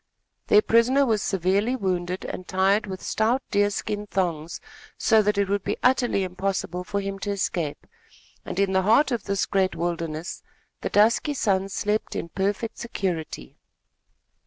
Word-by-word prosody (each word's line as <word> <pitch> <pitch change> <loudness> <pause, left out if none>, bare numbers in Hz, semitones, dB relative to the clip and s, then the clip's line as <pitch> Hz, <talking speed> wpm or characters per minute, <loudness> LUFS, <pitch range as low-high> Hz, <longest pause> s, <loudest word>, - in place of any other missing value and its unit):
Their 210 - +6
prisoner 250 +5 +4
was 220 -5 +1
severely 195 +7 +1
wounded 185 -4 -2
and 185 - -6
tied 195 +3 +2
with 190 -1 -6
stout 235 +5 +1
deer 205 0 +3
skin 210 0 -3
thongs, 170 -5 -2 0.4
so 220 -1 +4
that 210 0 0
it 200 -1 +2
would 200 0 -1
be - - -2
utterly 250 -5 +3
impossible 185 -1 -2
for 200 +2 -2
him 195 0 -4
to 205 - -4
escape, 175 -6 -2 0.6
and - - -6
in 200 -1 +2
the 190 0 +3
heart 230 +9 +4
of 235 -4 -2
this 200 -1 0
great 190 -1 +1
wilderness 165 -1 -3 0.4
the - - -2
dusky 230 +8 +3
sons 195 -5 0
slept 210 +1 -1
in 170 - -4
perfect 200 +5 -2
security. 175 - -4
195 Hz, 160 wpm, -25 LUFS, 185-215 Hz, 0.6 s, Their